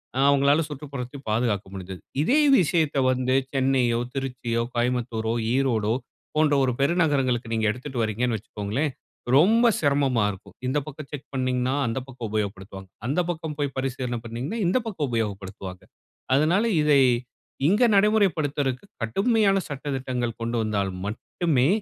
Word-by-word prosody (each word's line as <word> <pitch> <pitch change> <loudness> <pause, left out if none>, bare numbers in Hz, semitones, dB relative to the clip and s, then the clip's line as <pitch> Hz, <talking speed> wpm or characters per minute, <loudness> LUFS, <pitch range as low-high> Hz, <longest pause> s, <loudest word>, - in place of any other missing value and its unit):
ஆ - - -1
அவங்களால 140 +3 +4
சுற்றுப்புறத்த 140 -2 -6
பாதுகாக்க 110 -3 0
முடிஞ்சது. 95 -1 -7 0.2
இதே 260 - +3 0.2
விஷயத்த 160 -4 +1
வந்து 130 0 +1 0.2
சென்னையோ, 130 -3 +2 0.2
திருச்சியோ, 125 -3 -2
கோயம்புத்தூரோ, 120 -2 0 0.2
ஈரோடோ 115 -5 +1 0.4
போன்ற 155 -2 +4
ஒரு 125 -2 +1
பெருநகரங்களுக்கு 140 -7 +1
நீங்க 110 -1 +1
எடுத்துட்டுவரிங்ன்னு 120 -2 -2
வச்சுக்கோங்களேன், 110 +8 -3 0.5
ரொம்ப 225 +9 +5 0.2
சிரமமா 140 -6 +2
இருக்கும். 95 - -13
இந்த 130 - 0
பக்கம் 145 -1 -8
செக் 145 -2 -7
பண்ணினீங்கன்னா, 130 0 0
அந்த 115 +3 -1
பக்கம் 125 -3 -6
உபயோகப்படுத்துவாங்க. 95 -2 -4 0.2
அந்த 145 +7 0
பக்கம் 160 -3 -6
போய் 140 -2 -2
பரிசீலனை 125 -2 -2
பண்ணினீங்கன்னா, 125 - -4
இந்த 185 - +3
பக்கம் 165 -9 -2
உபயோகப்படுத்துவாங்க. 100 -4 -4 0.5
அதனால 165 +9 +3 0.2
இதை 150 -2 +5 0.7
இங்க 210 +7 +4
நடைமுறைப்படுத்துறதுக்கு 165 - +2 0.2
கடுமையான 195 - +2
சட்ட 140 -2 -6
திட்டங்கள் 125 -3 -3
கொண்டு 115 +1 -2
வந்தால் 100 -3 0 0.2
மட்டுமே, 130 - 0
130 Hz, 125 wpm, -25 LUFS, 115-145 Hz, 0.7 s, ரொம்ப